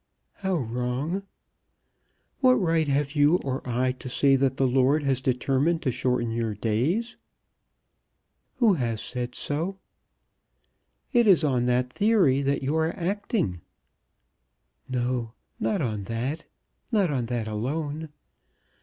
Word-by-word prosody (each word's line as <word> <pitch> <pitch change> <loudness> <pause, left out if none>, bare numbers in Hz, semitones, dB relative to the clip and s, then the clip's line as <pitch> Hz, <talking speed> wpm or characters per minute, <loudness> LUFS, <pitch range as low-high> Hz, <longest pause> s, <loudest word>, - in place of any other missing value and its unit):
"How 190 -2 -1
wrong?" 125 - -2 1.1
"What 255 -2 +6
right 165 -6 +1
have 140 0 +1
you 145 +2 +4
or 135 0 -2
I 125 +2 +1
to 130 0 -8
say 135 +2 +3
that 135 -1 +1
the 135 - +3
Lord 135 +4 +3
has 135 -2 +1
determined 135 +6 +1
to 130 - +1
shorten 125 -1 0
your 115 -2 -2
days." 130 - -1 1.4
"Who 235 -5 +4
has 120 -8 -1
said 125 +1 -4
so?" 165 +7 -2 1.4
"It 240 -2 +4
is 180 -5 +6
on 130 -5 +1
that 125 +1 +1
theory 195 -11 +3
that 140 0 0
you 140 +4 0
are 160 +5 0
acting." 180 - -1 1.3
"No; 125 -2 -1 0.3
not 200 -7 0
on 105 -5 -2
that; 125 +9 -3 0.5
not 200 -8 +2
on 125 -4 -1
that 120 -2 -2
alone. 145 +8 -3
135 Hz, 125 wpm, -26 LUFS, 125-165 Hz, 1.4 s, What